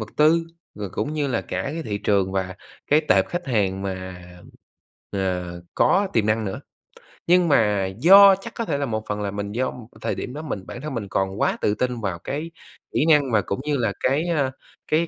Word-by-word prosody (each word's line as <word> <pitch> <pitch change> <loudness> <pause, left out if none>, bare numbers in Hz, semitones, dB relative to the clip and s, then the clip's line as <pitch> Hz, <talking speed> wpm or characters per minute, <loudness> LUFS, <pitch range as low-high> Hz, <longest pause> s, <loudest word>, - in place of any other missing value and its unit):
vật 110 - -5
tư, 165 +2 +4 0.3
rồi 105 -2 -6
cũng 145 +9 -3
như 150 -2 -1
là 125 - 0
cả - - -4
cái 155 +4 -4
thị 105 -7 -3
trường 100 -2 +1
và 95 -1 -2 0.3
cái 150 +2 +4
tệp 95 0 +4
khách 175 0 -4
hàng 100 -6 0
mà, 95 -2 -5 0.9
ờ, 90 -3 -3
có 200 0 +3
tiềm 110 -3 +2
năng 110 +1 +1
nữa. 95 - -4 0.7
Nhưng 180 0 +5
mà 105 -9 +3
do 195 +5 +9
chắc 230 +3 -8
có 230 - -2
thể 150 -7 -1
là 140 - -1
một 110 -3 -3
phần 105 0 -2
là 100 -1 -2
mình 100 0 -4
do 125 +4 -1 0.3
thời - - -1
điểm 125 - -5
đó 150 - -5
mình 105 -12 -5
bản 120 - -7
thân 150 -2 -5
mình 115 -5 -4
còn 95 0 -1
quá - - +2
tự 105 - +1
tin 125 -1 -2
vào 95 -5 -3
cái 150 - -5 0.4
kỹ - - +2
năng 145 -5 +4
và 110 - +4
cũng 100 +4 -4
như 150 -1 0
là 115 -5 0
cái, 145 +6 +1
a, 145 -6 +1 0.4
cái 165 +2 +2
115 Hz, 220 wpm, -23 LUFS, 100-150 Hz, 0.9 s, do